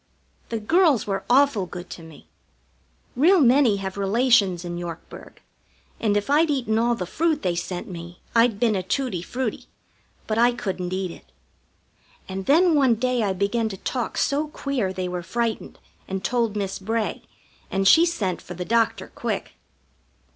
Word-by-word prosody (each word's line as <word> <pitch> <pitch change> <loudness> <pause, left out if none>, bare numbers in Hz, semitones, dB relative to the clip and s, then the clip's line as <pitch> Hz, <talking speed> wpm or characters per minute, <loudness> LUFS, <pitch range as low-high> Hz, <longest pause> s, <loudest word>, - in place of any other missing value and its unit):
The 230 - -2
girls 310 - +3
were 195 -1 -2
awful 250 -7 +3
good 175 +1 -8
to - - -8
me. 160 -2 -14 0.9
Real 345 +9 +5
many 255 -5 +4
have 195 0 -5
relations 200 -4 +2
in 175 0 -4
Yorkburg, 170 -1 -9 0.6
and 205 -2 +1
if 205 - -2
I'd 305 +3 +3
eaten 240 -6 0
all 235 +1 +2
the 185 - -4
fruit 315 - 0
they 180 -2 +1
sent 175 +1 -4
me 175 -1 -9 0.2
I'd 230 -3 +4
been 225 -3 +2
a 190 - 0
tutti 190 -1 -2
frutti; 245 +4 -4 0.6
but 220 0 -1
I 240 +1 +5
couldn't 185 -5 -4
eat 185 -1 -2
it. 60 - -15 1.0
And 190 0 -6
then 335 +4 +5
one 270 -6 +4
day 250 +1 0
I 200 -3 +1
began 205 +4 0
to 195 - -7
talk 245 +4 -3
so 290 +2 +1
queer 275 -9 -2
they 185 -1 -3
were 180 0 -4
frightened, 230 +5 -3 0.3
and 190 0 -4
told 230 0 0
Miss 195 -2 -3
Bray, 220 +3 -2 0.5
and 195 0 +1
she 325 - +7
sent 210 - -1
for 180 - -9
the 180 +1 -5
doctor 230 +1 0
quick. - - -3
220 Hz, 170 wpm, -24 LUFS, 190-250 Hz, 1.0 s, she